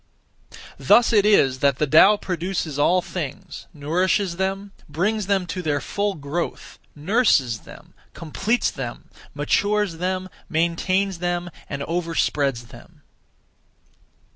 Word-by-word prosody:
Thus 235 0 +4
it 210 -1 +4
is 135 -11 +4
that 140 -2 +2
the 150 - +1
Tao 165 +8 +6
produces 175 -5 -3
(all 180 +5 +3
things), 155 -7 -7
nourishes 175 +5 0
them, 195 +1 -2 0.2
brings 200 +7 -1
them 195 -2 +1
to 180 +2 -5
their 150 -4 0
full 200 +8 -2
growth, 150 +4 -5 0.2
nurses 150 - +2
them, - - -15 0.2
completes 195 +9 -1
them, - - -7 0.2
matures 205 -4 0
them, 185 +1 -2 0.2
maintains 170 +3 0
them, 175 0 -2 0.2
and 140 -1 -4
overspreads 150 -7 -1
them. - - -16
175 Hz, 115 wpm, -22 LUFS, 150-195 Hz, 0.2 s, Tao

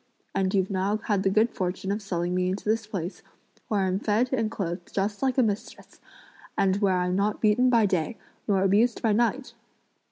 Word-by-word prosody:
and 190 0 0
you've 190 0 +1
now 195 +2 0
had 205 -4 +1
the 195 - +2
good 215 +4 +3
fortune 185 +1 -3
of 210 +2 -2
selling 175 -3 -2
me 180 0 +1
into 190 +3 -4
this 220 0 0
place, 190 -3 -5 0.5
where 210 -2 0
I'm 190 0 0
fed 225 +5 +1
and 225 -4 +1
clothed 185 -5 -5
just 200 +1 -2
like 265 -1 0
a 255 - +5
mistress, 210 -2 -4 0.6
and 190 0 +2
where 195 -3 +2
I'm 180 0 0
not 205 +2 0
beaten 225 +4 +3
by 230 -3 +4
day, 190 +3 -1 0.3
nor 195 -3 +2
abused 215 +5 +2
by 225 - +3
night! 240 +4 0
200 Hz, 195 wpm, -26 LUFS, 190-220 Hz, 0.6 s, a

